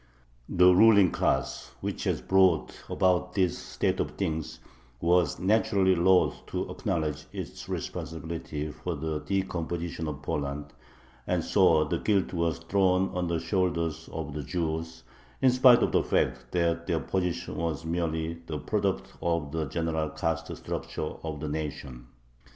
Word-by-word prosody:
The 90 +1 +6
ruling 100 -2 +6
class, - - -1
which - - -4
had - - -1
brought 95 -3 +4 0.2
about 90 0 +1
this 95 -3 +2
state - - -2
of - - -2
things, 80 0 -3 0.4
was 85 -3 +2
naturally 100 -1 +3
loth 90 +1 +3
to - - -3
acknowledge 75 -2 -2
its - - -7
responsibility 80 -2 -4
for 90 +3 -4
the 80 +1 -3
decomposition 85 -3 -2
of 75 -1 -6
Poland, 70 0 -3 0.5
and - - +1
so 80 -2 +4
the 80 +2 -2
guilt 100 -4 +1
was 85 -2 0
thrown 95 +2 +2
on 90 -1 0
the 85 -1 0
shoulders 85 -2 -1
of 80 -2 -5
the 75 - -3
Jews, 80 +1 -3 0.4
in 130 - +5
spite 125 -1 +7
of - - +1
the - - +3
fact 65 0 0
that 85 -1 0
their 85 -2 +1
position 90 -2 -2
was 80 -1 -2
merely 80 -1 -2
the 75 - -3
product 100 +3 -1
of 85 -4 -1
the 80 0 -1
general 80 +1 -1
caste - - -3
structure 75 - -4
of 80 -2 -4
the 75 - -4
nation. 70 -5 -5
85 Hz, 145 wpm, -28 LUFS, 80-90 Hz, 0.5 s, spite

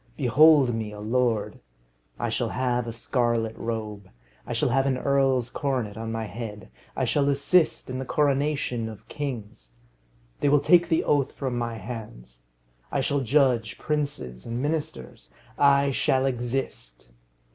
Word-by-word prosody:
Behold 140 0 +5
me 110 -2 -3
a 105 - -9
lord! 115 0 0 0.6
I - - -2
shall - - -1
have 125 -2 -1
a - - -3
scarlet 115 -1 -1
robe. 105 -4 -5 0.4
I - - -3
shall - - +1
have 135 +2 +2
an 130 -2 +1
earl's 135 -3 +1
coronet 130 -8 -2
on 115 0 -5
my 115 0 -3
head. 105 - -8 0.2
I - - 0
shall 145 -1 +2
assist 155 +4 +2
at 130 0 -4
the - - -3
coronation 140 -4 0
of 110 -2 -12
kings. 110 - -6 0.7
They 145 - +2
will 145 +1 +5
take 175 +3 +4
the 165 - +2
oath 140 -2 +1
from 130 -3 -3
my 120 -1 -2
hands. 95 - -9 0.5
I 140 - 0
shall 140 +1 0
judge 125 -5 +2
princes 145 - -3
and 115 +1 -3
ministers. 70 - -4 0.3
I 140 0 +4
shall 130 0 +1
exist. 120 - -3
125 Hz, 150 wpm, -26 LUFS, 110-140 Hz, 0.7 s, Behold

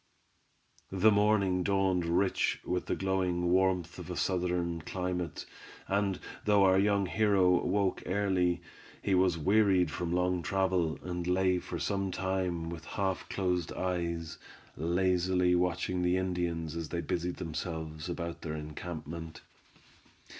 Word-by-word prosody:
The 95 +3 +4
morning 100 -3 +3
dawned 95 -2 +1
rich 90 +3 +1
with 90 0 -2
the - - 0
glowing 90 -2 0
warmth 90 -2 +1
of - - -8
a 90 - -3
Southern 90 -2 0
climate, 90 -1 -3 0.4
and 100 -3 0 0.3
though 105 -1 +5
our 95 0 +5
young 100 0 +2
hero 95 -3 +3
woke 100 -2 +1
early, 90 -3 +1 0.4
he 100 - +1
was 90 -2 +3
wearied 95 -1 +3
from 85 +1 -3
long 90 0 +1
travel, 95 -5 0
and 90 -1 -4
lay 90 0 +2
for - - -6
some 100 -1 -1
time 90 -3 -2
with 80 -1 -8
half 95 -2 -2
closed 90 -3 -1
eyes, 85 -2 -3 0.4
lazily 90 +2 +2
watching 90 0 0
the 90 +1 +2
Indians 85 -3 -2
as 85 -2 -4
they 85 - -2
busied 90 0 -2
themselves 80 -1 -5
about 85 -1 -4
the 75 - -4
encampment. 80 +1 -6
90 Hz, 130 wpm, -31 LUFS, 85-95 Hz, 0.4 s, though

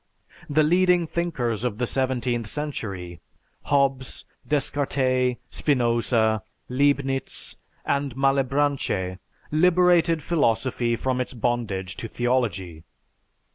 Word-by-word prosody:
The 155 +1 +4
leading 180 +2 +4
thinkers 130 -10 -2
of 120 -4 -1
the 125 - 0
seventeenth 125 -3 -1
century, 100 - -5 0.5
Hobbes, 135 -2 +1 0.2
Descartes, 130 -3 +1 0.2
Spinoza, 115 -5 +1 0.3
Leibnitz, 135 0 0 0.3
and 140 -3 -1
Malebranche, 135 -8 +1 0.3
liberated 170 -1 +4
philosophy 120 -5 +1
from 130 +1 -1
its 125 - -5
bondage 105 -6 -2
to 115 - -5
theology. 105 -10 -1
130 Hz, 90 wpm, -24 LUFS, 115-145 Hz, 0.5 s, The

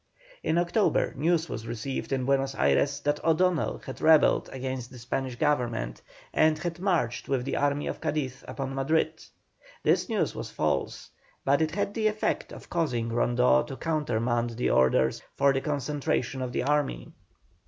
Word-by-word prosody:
In 160 - 0
October 175 +5 +2
news 165 +3 +1
was 115 +1 -6
received 120 +5 -4
in 130 -2 0
Buenos 135 0 +1
Ayres 70 - +2
that 145 0 -1
O'Donnell 165 +1 +2
had 130 - -7
rebelled 160 -1 +5
against 130 -1 -4
the 125 - -12
Spanish 125 +1 -3
Government, 120 - -1 0.3
and 155 0 +4
had 170 +2 -4
marched 175 -11 0
with 130 -2 0
the - - -2
army 145 0 +1
of - - -4
Cadiz 135 -4 -2
upon 135 -1 -4
Madrid. 135 +4 0 0.6
This - - +2
news - - 0
was - - -6
false, - - -2 0.3
but 140 +3 +3
it 160 +1 0
had 200 0 -1
the 220 -1 +1
effect 215 0 -1
of - - -10
causing 125 -9 -1
Rondeau 115 - +3
to 130 - -7
countermand 120 -6 0
the 125 - +1
orders 65 0 +3 0.2
for 140 0 +4
the 135 - 0
concentration 140 -3 -1
of 125 -1 -3
the 125 - -1
army. 140 - 0
135 Hz, 165 wpm, -28 LUFS, 120-155 Hz, 0.6 s, rebelled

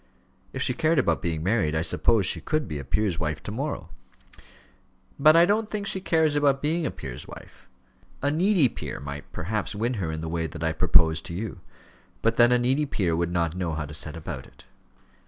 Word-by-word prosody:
"If - - -2
she - - +1
cared 160 +3 +1
about 85 - +2
being 80 -2 -2
married, 95 -6 +1
I 80 - +1
suppose 105 +3 +2
she - - 0
could 155 -1 -1
be 75 - -4
a - - -6
peer's 85 +5 0
wife 75 -2 -3
to - - -5
morrow." 115 - -4 1.3
"But 155 +3 +7
I 170 +1 +7
don't 210 +3 +1
think 210 -1 -3
she 195 -1 -2
cares 160 -4 +2
about 140 -2 +3
being 155 +3 0
a - - -1
peer's 65 -4 -8
wife. - - -13 0.6
A 145 - +2
needy 175 -1 +4
peer - - -6
might 70 0 -8
perhaps 105 +3 -3
win 115 +4 -1
her 80 -3 -2
in 80 0 -4
the 80 - -4
way 80 0 -2
that 85 0 -7
I 80 - +1
propose 80 -1 +4
to 85 - -7
you; 105 -1 -5 0.6
but 115 0 +2
then 120 0 +6
a 125 - +5
needy 130 +5 +1
peer 90 -10 0
would 85 +1 -1
not 85 -2 0
know 90 -3 -2
how 75 -1 -3
to 75 - -9
set 80 0 -3
about 80 - -7
it. - - -19
100 Hz, 215 wpm, -26 LUFS, -, 1.3 s, But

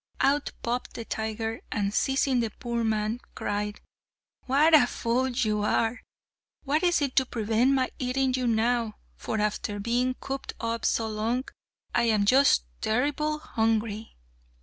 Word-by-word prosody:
Out 285 +1 +2
popped 240 +1 -3
the 230 - -6
tiger, 225 +1 -3
and, 205 -1 -1
seizing 270 0 +2
the 230 -2 0
poor 235 +2 -3
man, 220 +1 0 0.2
cried, 205 0 -3 0.7
"What 295 +5 +4
a 285 -6 +7
fool 245 +3 0
you 220 -4 0
are! 225 +3 +1 0.6
What 295 +2 +1
is 350 -4 +2
to 265 - +4
prevent 230 +4 +1
my 260 -1 +1
eating 260 +1 0
you 255 -1 0
now, 230 -1 +1 0.2
for 220 - -3
after 210 0 -1
being 245 +4 0
cooped 270 +1 -5
up 230 0 -2
so 225 - +1
long 220 +4 -1 0.5
I - - +3
am 215 -3 +2
just 260 - +5 0.2
terribly 290 +6 0
hungry!" 220 -1 -1
235 Hz, 145 wpm, -27 LUFS, 220-260 Hz, 0.7 s, a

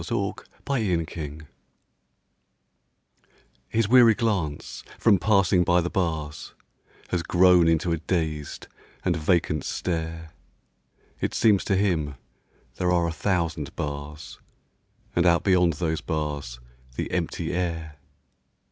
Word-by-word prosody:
THE - - -2 0.3
PANTHER 85 - -2 2.2
His 115 -2 +1
weary 120 -1 +7
glance, 95 - -2
from 105 -5 +4
passing 95 -4 +3
by 90 0 +3
the 90 0 -2
bars, 80 -5 -3 0.5
Has 90 - 0
grown 90 0 +5
into 80 +1 +2
a 85 - +1
dazed 80 -3 -3 0.4
and 90 -2 +2
vacant 80 -2 +1
stare; 80 -2 -3 0.9
It - - -2
seems 105 -4 +4
to 95 - +1
him 80 -8 0 0.6
there 90 0 +1
are 85 -1 +2
a - - -2
thousand 85 -5 -2
bars 75 +1 -6 0.8
And 85 0 +3
out 85 -1 +3
beyond 90 -3 +3
those 80 0 -2
bars 75 -6 -4 0.4
the - - -3
empty - - -2
air. 80 -4 -3
85 Hz, 110 wpm, -25 LUFS, 80-90 Hz, 2.2 s, weary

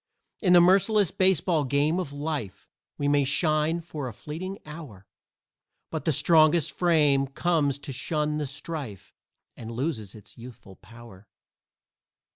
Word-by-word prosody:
In 180 -4 +3
the 175 - +8
merciless 195 +2 +3
baseball 185 -4 +2
game 145 +5 +1
of 175 -7 -4
life 145 -10 -5 0.3
We 145 - -1
may 145 0 +3
shine 155 +3 +1
for 155 -5 -6
a 120 - -7
fleeting 175 - -7
hour, 150 - -11 0.9
But 160 - -4
the 160 - +2
strongest 155 +1 +4
frame 150 -6 +2
comes 145 -1 0
to 140 -1 -8
shun 150 +3 -2
the 150 - -3
strife 140 - -7 0.4
And 115 - -9
loses 115 - -4
its 110 +2 -14
youthful 115 -5 -13
power. 115 -2 -15
150 Hz, 135 wpm, -26 LUFS, 130-165 Hz, 0.9 s, the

